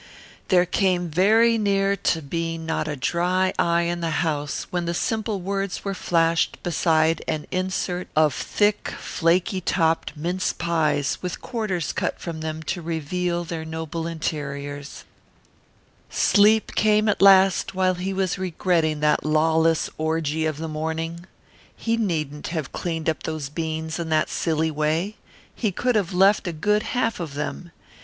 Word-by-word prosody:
There 180 -2 +4
came 180 -1 +1
very 220 +7 +4
near 200 -1 +2
to 165 -4 0
being 165 +2 -3
not 160 -1 -1
a 150 - -2
dry 180 +6 +1
eye 170 0 +3
in 175 0 -1
the 165 0 0
house 145 -2 -2
when 175 -1 -1
the 170 0 -2
simple 220 +1 -1
words 195 +1 -3
were 200 - -1
flashed 165 -2 +1
beside 160 -1 +2
an 155 - -2
insert 185 -1 -2
of 155 -2 +4
thick, 205 0 0
flaky 180 +3 +1
topped 165 -3 0
mince 175 +4 -1
pies 155 -5 0
with 180 -1 -4
quarters 205 -9 -2
cut - - -2
from 165 -2 -6
them 160 0 -4
to 175 +3 -3
reveal 170 +2 -2
their 165 -1 -5
noble 160 +1 -4
interiors 145 -3 -5 1.1
Sleep 215 +1 +4
came 215 0 +3
at 210 - +1
last 195 -1 +5
while 185 0 +2
he 180 +2 -3
was 190 -1 -1
regretting 165 -4 0
that 150 0 +2
lawless 160 +1 +2
orgy 160 0 0
of 155 -2 -3
the 160 +1 -4
morning. 160 +2 -4 0.5
He 230 0 -1
needn't 155 -9 -2
have 155 -4 -4
cleaned 165 -2 -3
up 160 - 0
those 155 -3 -4
beans 160 +1 -3
in 165 -1 -3
that 155 -1 +2
silly 160 -1 0
way. 155 +7 -1 0.4
He 215 -4 -1
could 250 +7 0
have 200 -5 0
left 195 +2 +4
a - - -1
good 210 +7 +1 0.2
half 230 -3 0
of 155 -5 -5
them. 150 +4 -4
170 Hz, 155 wpm, -24 LUFS, 160-185 Hz, 1.1 s, last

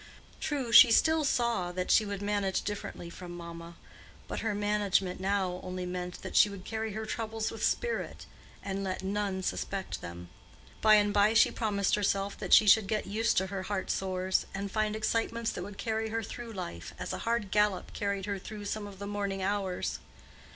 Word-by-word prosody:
True, 270 -6 -2
she 230 0 +10
still 320 +6 +4
saw 235 -9 +1
that 185 0 -1
she 215 - +5
would 200 0 -4
"manage 200 -2 0
differently 205 -4 -5
from 175 0 -9
mamma;" 170 0 -9 0.5
but - - -4
her 220 -2 -1
management 205 -3 +1
now 190 -2 0
only 185 0 -5
meant 180 0 -5
that - - -6
she 210 - +7
would 200 -2 -9
carry 220 -1 -3
her 220 +1 -4
troubles 220 0 -3
with - - -6
spirit, 475 -1 -1 0.4
and 195 0 -3
let 185 0 -3
none 195 -1 -1
suspect 195 +1 -3
them. 85 0 -8 0.5
By 215 -1 +7
and 205 -1 +3
by 210 +2 +4
she - - +6
promised 200 -3 0
herself 200 -1 +1
that - - -5
she 215 - +8
should 210 0 +6
get 215 +1 -1
used 220 +4 0
to 190 - +2
her 195 - -2
heart 190 0 -2
sores, 185 0 0
and 200 0 -4
find 215 0 0
excitements 230 +1 0
that - - -5
would 195 +2 -8
carry 220 -1 -2
her 225 +1 -2
through 235 +2 -7
life, 85 - -6
as - - -4
a - - -4
hard 230 -4 -1
gallop 210 -3 +1
carried 200 -2 -2
her 200 -1 -3
through 210 +2 -8
some 205 0 -3
of 200 -1 -11
the 200 - -6
morning 200 -1 -2
hours. 195 -2 -1
200 Hz, 195 wpm, -30 LUFS, 190-220 Hz, 0.5 s, she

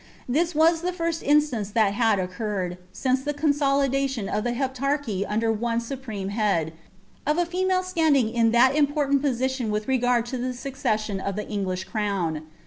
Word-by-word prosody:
This 330 +7 +1
W8« 325 +2 +4
the 360 +1 -1
£rsl 335 -1 -2
inilance 275 -9 +2
thtit 215 -3 +3
!iui 205 -4 +2
oceurreui 185 -2 -3
since 260 0 0
the 295 +1 -3
consolidation 275 -5 +1
of 210 +1 -1
the 240 - -1
Heptarchy 265 -5 -1
under 225 +2 +1
one 230 +1 -1
supifmc 235 -6 -5
head, 200 -7 0 0.5
of 300 +2 +2
a 350 - +2
female 370 +1 0
itanding 310 -10 +2
in 230 -1 +3
that 250 +4 +4
important 285 -2 +2
posiiioo 260 -3 -1
with 210 0 -2
reg»ril 245 -2 +2
to 245 +2 -5
the 255 +1 -2
suceesaioti 220 -6 -2
of 200 - -2
the 210 - -4
English 190 -3 -2
crown. 185 -6 -2
245 Hz, 165 wpm, -25 LUFS, 210-285 Hz, 0.5 s, W8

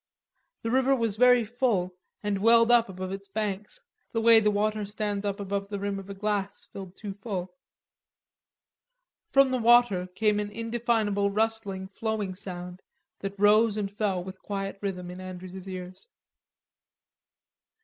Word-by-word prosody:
The 225 - -1
river 265 +2 +3
was 230 -5 -1
very 245 0 +5
full, 215 -6 0 0.3
and 205 -1 0
welled 230 +2 +5
up 235 -3 +5
above 185 0 -5
its 195 0 -6
banks, 210 - -3 0.3
the 225 - +1
way 225 0 +7
the 210 -1 +3
water 210 +1 0
stands 205 0 -3
up 200 0 -3
above 200 0 -3
the 205 - -3
rim 200 0 -2
of 195 0 -11
a 200 - -6
glass 205 -1 -2
filled 190 -2 -10
too 205 -2 -6
full. 190 -3 -5 1.8
From 275 -1 +5
the 255 - +1
water 235 -6 +5
came 210 -1 +2
an 205 0 -2
indefinable 225 -2 0
rustling, 205 -2 -1
flowing 210 -1 -3
sound 180 -1 -7 0.4
that 195 0 -5
rose 210 +2 +4
and 200 -2 -2
fell 200 -3 -1
with 190 +1 -9
quiet 195 -1 -4
rhythm 180 -3 -4
in 180 +1 -8
Andrews's 185 0 -8
ears. 185 - -8
205 Hz, 150 wpm, -27 LUFS, 195-225 Hz, 1.8 s, way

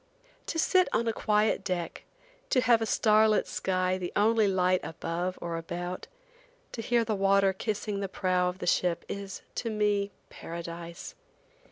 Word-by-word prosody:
To - - -3
sit 370 +3 +4
on 235 - +1
a 225 - +1
quiet 210 -1 +1
deck, 180 -3 -3 0.4
to 255 - +3
have 235 -2 +4
a 225 - 0
star 215 0 +4
lit 215 - +2
sky 185 0 -1
the 175 -1 -4
only 220 +1 +4
light 185 -1 +2
above 175 +3 -3
or 170 -1 -3
about, 175 +2 -5 0.6
to 230 - -5
hear 235 +1 +2
the 220 - 0
water 195 -1 +3
kissing 210 0 -3
the 195 -1 -3
prow 185 -1 +1
of 180 - -6
the - - -5
ship, 175 -1 +1
is, 200 -1 -6
to 230 - -3
me, 210 -2 +1 0.2
paradise. 170 0 -7
195 Hz, 165 wpm, -29 LUFS, 180-215 Hz, 0.6 s, sit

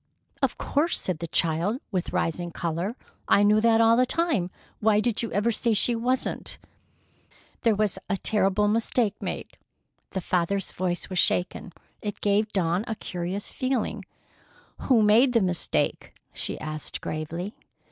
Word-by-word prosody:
"Of - - +1
course," 310 +5 0
said 180 -4 -3
the 170 - -4
child, 170 +9 +1
with 185 -3 -2
rising 175 +2 -1
color. 170 +6 -3 0.3
"I 200 - +5
knew 210 +1 +5
that 225 0 +4
all 225 0 +6
the 250 +1 +3
time. 285 - +1 0.3
Why 215 -1 +4
did 225 0 0
you 230 - -3
ever 210 +4 +2
say 230 0 +1
she 235 +4 +3
wasn't?" 250 +3 -1 1.0
"There 225 -3 +3
was 210 -1 0
a 195 - +1
terrible 205 0 +2
mistake 225 0 +1
made." - - -5 0.6
The 190 - -1
father's 180 +3 0
voice 175 -1 -2
was 185 - 0
shaken. 180 +1 +1 0.3
It 205 -1 -4
gave 210 +1 +1
Dawn 180 0 +1
a 225 - -2
curious 180 +1 -4
feeling. 260 -2 -1 0.8
"Who 240 -5 +5
made 235 +5 +5
the 230 - +5
mistake?" 180 -2 -1 0.2
she - - -4
asked 155 -1 -4
gravely. 165 +6 -4
205 Hz, 150 wpm, -26 LUFS, 180-230 Hz, 1.0 s, all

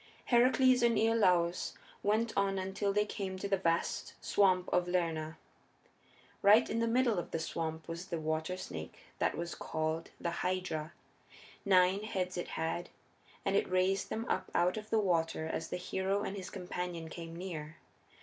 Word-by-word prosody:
Heracles 255 +1 +5
and 235 -1 +4
Iolaus 180 -6 +3 0.3
went 220 +2 +1
on 195 -1 +1
until 190 +2 -1
they 210 +1 +2
came 195 -2 -4
to 200 - -3
the 200 - +3
vast 170 -3 0
swamp 185 -2 +3
of 180 0 +3
Lerna. 165 -3 -1 1.0
Right 210 +4 +7
in 230 - -1
the 230 - +1
middle 235 -4 +3
of - - -5
the - - -2
swamp 160 -1 -3
was 170 +2 -6
the 170 - -3
water 160 +3 -2
snake 80 - -7 0.2
that - - +1
was 170 0 -3
called 160 +1 -2
the 170 - -2
Hydra. 180 -4 -2 0.7
Nine 185 0 +5
heads 185 -4 -2
it 175 - -3
had, 165 +2 -2 0.6
and 195 - +1
it - - +2
raised 185 +1 +1
them 225 +1 -3
up - - -1
out 180 +1 +3
of 215 0 -6
the 225 - +2
water 165 -6 +1
as 160 - -3
the - - -2
hero 190 +2 -1
and 200 - -3
his 190 -2 -6
companion 180 -2 -5
came 165 0 -8
near. 160 -3 -6
185 Hz, 170 wpm, -33 LUFS, 165-200 Hz, 1.0 s, Right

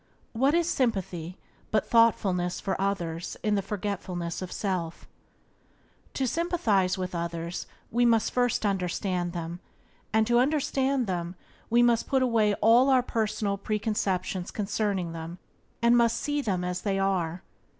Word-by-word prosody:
What 270 +6 +2
is 340 -1 +2
sympathy 190 - -1 0.3
but 215 -2 +1
thoughtfulness 190 -6 +3
for 195 -2 -2
others 175 -4 -2
in 210 - +1
the 200 - +2
forgetfulness 185 -4 -4
of 185 - -6
self? 180 -5 -3 1.1
To 270 - 0
sympathize 230 - +1
with 185 -1 -4
others 170 0 -4 0.2
we 240 +2 +2
must 230 -2 +3
first 245 -3 +1
understand 180 -2 -1
them, 170 0 -5 0.5
and 220 +1 +3
to 240 +1 +3
understand 270 -1 +1
them 175 -2 -3 0.3
we 240 +1 +5
must 235 -1 +3
put 265 -1 +2
away 220 -4 +2
all 255 +4 +6
personal 215 -4 -1
preconceptions 195 -4 -1
concerning 205 -4 -1
them, 165 +1 -7 0.5
and 235 +1 +6
must 235 -1 +3
see 290 0 -1
them 190 -8 -1
as 180 0 -2
they 195 -2 0
are. 185 -3 -1
200 Hz, 140 wpm, -27 LUFS, 180-235 Hz, 1.1 s, all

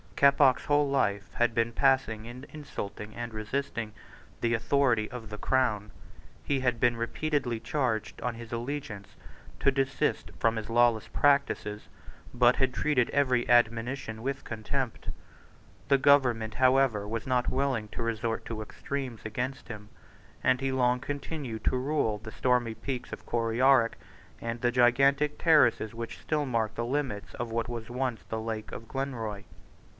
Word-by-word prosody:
Keppoch's 140 -2 +5
whole 145 0 +3
life 105 -8 0
had 120 -1 +2
been 115 0 +1
passed 135 +1 +3
in 110 0 -6 0.2
insulting 110 -8 -7
and 120 -1 -5
resisting 110 0 -3 0.5
the 115 0 +1
authority 120 -2 +2
of 120 -4 -8
the 105 - -6
Crown. 110 -5 0 0.5
He 140 -2 0
had 125 -2 0
been 120 0 +3
repeatedly 120 +1 -1
charged 120 -6 -2
on 120 -1 -2
his 115 0 -10
allegiance 120 -4 -5 0.5
to 140 - +4
desist 135 0 0
from 115 0 +2
his 110 0 -5
lawless 120 -1 +3
practices, 140 -7 +1 0.5
but 120 0 +5
had 130 -1 +1
treated 130 -5 +1
every 130 -4 +2
admonition 115 0 +2
with 135 +2 -3
contempt. 120 +3 -4 0.8
The 140 0 +5
government, 125 -6 +3
however, 130 -5 +3
was 115 +1 -3
not 125 -1 +1
willing 130 -5 0
to 115 - -5
resort 115 0 -2
to 110 -2 -5
extremities 125 +1 -5
against 125 +5 -4
him; 105 -2 -8 0.5
and 130 0 +3
he 135 0 0
long 125 -1 +2
continued 140 -4 -5
to 130 - +2
rule 130 -5 0
undisturbed 105 - -11
the 110 - -6
stormy 125 -3 +2
peaks 130 -1 -5
of - - -8
Coryarrick, 120 +1 +3 0.4
and 115 0 -4
the 120 - +2
gigantic 135 +4 +3
terraces 150 -9 +4
which 115 0 -6
still 150 -2 -1
mark 115 -3 0
the 115 - -2
limits 125 -5 -2
of 120 -1 -4
what 115 +1 -1
was 115 -1 -5
once 125 -5 -2
the 110 0 -2
Lake 110 -1 -4
of 115 - -8
Glenroy. 115 -7 -4
120 Hz, 155 wpm, -29 LUFS, 115-135 Hz, 0.8 s, Keppoch's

